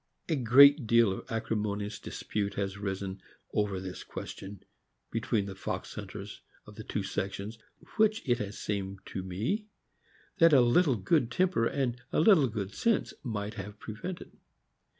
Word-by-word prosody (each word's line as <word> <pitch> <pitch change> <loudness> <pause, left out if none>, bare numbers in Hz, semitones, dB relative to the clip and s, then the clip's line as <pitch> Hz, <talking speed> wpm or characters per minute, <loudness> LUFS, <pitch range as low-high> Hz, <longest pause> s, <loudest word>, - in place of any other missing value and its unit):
A 160 - +1
great 140 +1 +7
deal 115 -2 +5
of 95 - -7
acrimonious 105 -2 -2
dispute 100 -1 -3
has 100 -1 -2
arisen 95 -1 -4 0.3
over 105 -3 0
this 95 0 -7
question, 100 0 -8 0.5
between 115 -2 0
the 100 - -6
fox 95 - -5
hunters - - -8 0.2
of - - -12
the - - -8
two - - -3
sections, 100 +3 -4 0.4
which 220 -5 +3
it 120 -2 +2
has 105 0 -4
seemed 100 -1 -3
to 95 - -5
me 110 - -2 0.7
that 165 -1 +7
a 135 - +8
little 130 +4 +4
good 115 - +2
temper 175 -4 +2
and 125 -3 -1
a - - +2
little 160 -5 +6
good 105 -4 -4
sense 230 -2 +1
might 105 -5 -3
have 105 -1 -7
prevented. 115 - -7
110 Hz, 150 wpm, -30 LUFS, 100-135 Hz, 0.7 s, a